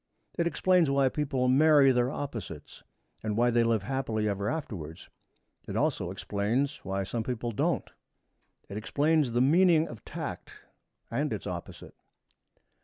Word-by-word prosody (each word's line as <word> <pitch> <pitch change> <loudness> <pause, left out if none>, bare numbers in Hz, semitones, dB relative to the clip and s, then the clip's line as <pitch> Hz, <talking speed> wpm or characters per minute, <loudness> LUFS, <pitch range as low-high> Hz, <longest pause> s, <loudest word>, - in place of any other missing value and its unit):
It 170 - +1
explains 180 -2 +3
why 140 -1 +3
people 135 -3 -1
marry 140 +1 +6
their 125 0 +2
opposites 115 - -7 0.4
and 105 -1 -2
why 120 +1 +3
they 120 0 +3
live 115 -3 +1
happily 115 -4 -1
ever 100 0 -1
afterwards. 90 - -6 0.6
It - - -5
also - - 0
explains 115 +8 -1
why 95 0 -2
some 115 +4 -3
people 120 0 -3
don't. 105 - 0 0.8
It 100 - -6
explains 145 +4 +1
the 120 - +2
meaning 165 +3 +4
of 115 - -10
tact - - -6 0.6
and - - -1
its - - -4
opposite. - - -7
125 Hz, 140 wpm, -29 LUFS, 110-145 Hz, 0.8 s, marry